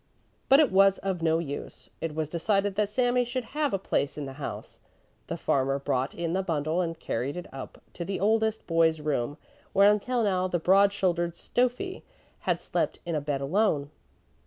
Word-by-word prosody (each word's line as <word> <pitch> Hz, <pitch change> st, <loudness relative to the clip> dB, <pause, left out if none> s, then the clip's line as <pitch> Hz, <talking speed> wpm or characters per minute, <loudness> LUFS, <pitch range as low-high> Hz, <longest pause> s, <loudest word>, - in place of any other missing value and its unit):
But 275 Hz, -, +8 dB
it 300 Hz, -5 st, +4 dB
was 195 Hz, 0 st, +5 dB
of 190 Hz, -3 st, -3 dB
no 160 Hz, 0 st, +3 dB
use; 145 Hz, -4 st, -6 dB
it 160 Hz, -2 st, -3 dB
was 155 Hz, -1 st, -1 dB
decided 195 Hz, +5 st, 0 dB
that 210 Hz, +1 st, 0 dB
Sami 245 Hz, +2 st, +2 dB
should 245 Hz, +1 st, -3 dB
have 295 Hz, -2 st, +1 dB
a 195 Hz, -, +1 dB
place 145 Hz, -7 st, -1 dB
in 145 Hz, -, -4 dB
the 135 Hz, -, -7 dB
house. -, -, -6 dB, 0.5 s
The -, -, -3 dB
farmer 135 Hz, 0 st, +1 dB
brought 135 Hz, -1 st, -1 dB
in 170 Hz, -1 st, -2 dB
the 190 Hz, -, +1 dB
bundle 160 Hz, -1 st, 0 dB
and 165 Hz, -2 st, -3 dB
carried 135 Hz, +5 st, -3 dB
it 180 Hz, -, -5 dB
up 135 Hz, -1 st, -8 dB
to 175 Hz, -, -5 dB
the 190 Hz, +2 st, -3 dB
oldest 220 Hz, +1 st, +1 dB
boy's 165 Hz, -1 st, +3 dB
room, 145 Hz, -2 st, -1 dB, 0.4 s
where 200 Hz, +1 st, +7 dB
until 235 Hz, +3 st, 0 dB
now 185 Hz, -3 st, +1 dB
the 180 Hz, -, 0 dB
broad 195 Hz, +4 st, +5 dB
shouldered 175 Hz, -4 st, 0 dB
Stöffi 250 Hz, -, -1 dB, 0.5 s
had -, -, +2 dB
slept -, -, -1 dB
in 170 Hz, -, -3 dB
a 150 Hz, -, 0 dB
bed 145 Hz, -1 st, -2 dB
alone. 150 Hz, -2 st, +1 dB
180 Hz, 190 wpm, -28 LUFS, 155-210 Hz, 0.5 s, But